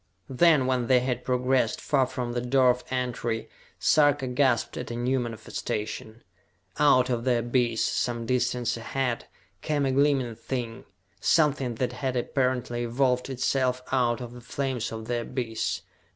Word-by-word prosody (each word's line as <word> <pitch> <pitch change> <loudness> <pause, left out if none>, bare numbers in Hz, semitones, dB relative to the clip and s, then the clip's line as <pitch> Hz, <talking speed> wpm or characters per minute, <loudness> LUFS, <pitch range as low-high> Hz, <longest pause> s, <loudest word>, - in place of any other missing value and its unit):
Then, 150 0 +4
when 125 -2 0
they 130 -2 +5
had 125 -1 -2
progressed 125 -2 +1
far 135 -4 +1
from 125 -2 -4
the 120 - -1
door 125 +1 +4
of 125 0 -4
entry, 120 -3 -2 0.3
Sarka 145 -2 +3
gasped 125 -2 +1
at 125 - -5
a 120 - -4
new 125 +2 0
manifestation. 110 -1 -5 0.6
Out 130 -4 +5
of 120 -1 -1
the 125 -1 +2
abyss, 120 -1 +1
some 120 -1 -1
distance 125 0 0
ahead, 120 +1 -2 0.3
came 145 -2 0
a 135 - +1
gleaming 135 -3 +2
thing, 120 -1 -5 0.3
something 140 -6 +2
that 125 +2 -2
had 130 0 -2
apparently 125 -1 -1
evolved 125 +2 +1
itself 130 -1 0
out 125 -2 +1
of 120 -1 -7
the 125 - -11
flames 130 -1 -3
of 110 -1 -6
the 120 0 -1
abyss. 115 -3 -3
125 Hz, 150 wpm, -27 LUFS, 120-130 Hz, 0.6 s, they